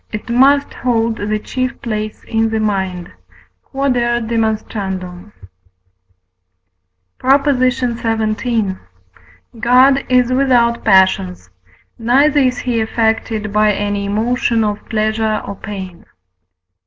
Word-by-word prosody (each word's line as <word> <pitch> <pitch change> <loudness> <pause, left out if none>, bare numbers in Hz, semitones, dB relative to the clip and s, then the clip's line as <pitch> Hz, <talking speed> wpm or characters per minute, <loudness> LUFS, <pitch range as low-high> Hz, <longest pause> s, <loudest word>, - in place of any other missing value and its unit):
it 215 +2 -6
must 275 +3 +3
hold 230 -2 -1
the 210 +1 -2
chief 255 +4 -4
place 215 -2 -5
in 225 0 0
the 220 0 -1
mind. 190 -4 -2 0.6
Q.E.D. 240 -4 0 2.8
PROP. 275 +2 +3
XVII. 235 -5 0 0.8
God 255 +4 +4
is 250 0 +3
without 245 -3 +2
passions, 95 - +2 0.5
neither 275 +6 +3
is 255 -2 +1
he 245 -2 -1
affected 220 -1 -1
by 210 0 +3
any 205 0 -2
emotion 225 +2 0
of 210 -1 -2
pleasure 220 0 0
or 200 - -5
pain. 190 -4 -8
225 Hz, 95 wpm, -16 LUFS, 210-250 Hz, 2.8 s, God